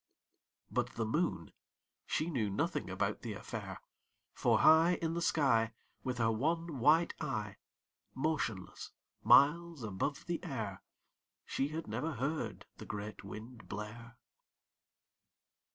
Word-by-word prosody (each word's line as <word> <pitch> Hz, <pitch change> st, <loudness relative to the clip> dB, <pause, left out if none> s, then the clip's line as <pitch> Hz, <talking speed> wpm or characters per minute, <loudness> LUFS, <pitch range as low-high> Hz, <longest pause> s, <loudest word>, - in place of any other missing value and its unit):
But -, -, 0 dB
the 115 Hz, -, 0 dB
Moon, 110 Hz, -, 0 dB, 0.6 s
she 160 Hz, +3 st, 0 dB
knew 115 Hz, -8 st, 0 dB
nothing 100 Hz, -, -1 dB
about -, -, -1 dB
the -, -, -4 dB
affair, -, -, -6 dB, 0.6 s
For -, -, +3 dB
high 165 Hz, +3 st, +7 dB
In 165 Hz, -1 st, -1 dB
the 170 Hz, -, -1 dB
sky, 115 Hz, -9 st, +3 dB, 0.3 s
With 125 Hz, -1 st, -2 dB
her 115 Hz, -1 st, +3 dB
one 160 Hz, +5 st, -1 dB
white 160 Hz, +7 st, +5 dB
eye, 105 Hz, -9 st, -3 dB, 0.6 s
Motionless, 130 Hz, -10 st, -2 dB, 0.3 s
miles 165 Hz, 0 st, +5 dB
above 110 Hz, +7 st, -2 dB
the 175 Hz, -1 st, -3 dB
air, 110 Hz, -, -4 dB, 0.6 s
She 135 Hz, -, 0 dB
had 155 Hz, +2 st, -4 dB
never 125 Hz, +10 st, -2 dB
heard 140 Hz, +5 st, -2 dB
the -, -, -9 dB
great 105 Hz, 0 st, -6 dB
Wind 110 Hz, +4 st, -9 dB
blare. 115 Hz, +3 st, -7 dB
130 Hz, 120 wpm, -34 LUFS, 110-160 Hz, 0.6 s, high